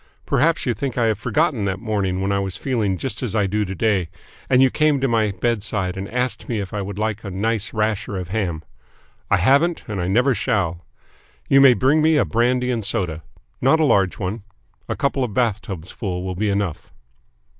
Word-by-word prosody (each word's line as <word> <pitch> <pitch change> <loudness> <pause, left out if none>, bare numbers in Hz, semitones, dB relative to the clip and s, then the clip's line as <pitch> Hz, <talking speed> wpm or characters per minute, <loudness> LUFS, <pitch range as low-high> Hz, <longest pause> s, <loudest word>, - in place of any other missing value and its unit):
Perhaps 165 +5 +2
you 125 - +1
think 130 +3 -4
I 120 - +2
have 110 -3 +1
forgotten 150 -6 0
that 95 -1 -2
morning 100 -5 -1
when 100 +1 0
I 100 - +1
was 95 -2 -3
feeling 110 -8 -1
just 130 - -4
as 115 -4 -3
I 105 -2 +2
do 105 +2 0
to 95 0 -5
day 95 -4 +1 0.4
and 130 -1 +4
you 130 -1 +5
came 150 -2 +2
to 135 - +1
my 115 -3 +2
bedside 100 -2 -2
and 95 +1 -5
asked 125 +1 -2
me 115 -3 -1
if 100 -2 -5
I 105 - -2
would 100 0 -6
like 110 0 -2
a 100 - -5
nice 105 +2 -1
rasher 105 -2 -1
of 90 -2 -5
ham. 90 -6 -2 0.7
I - - +4
haven't 140 - +3
and 105 -5 -3
I 90 - -1
never 125 +8 +3
shall. 95 -9 -1 0.6
You 135 0 +5
may 130 -3 +7
bring 135 +9 +3
me 160 0 +4
a 140 - +3
brandy 125 +2 +1
and 115 -3 -2
soda. 90 -7 -1 0.4
Not 135 +5 +4
a 155 - +4
large 95 -9 +2
one. 100 +3 -3 0.5
A - - -1
couple 140 -1 0
of 110 -5 -4
bath 115 -4 +1
tubs 90 -4 -7
full 90 -3 -4
will 95 0 -3
be 105 +4 -1
enough." 100 -5 -2
110 Hz, 215 wpm, -21 LUFS, 95-125 Hz, 0.7 s, may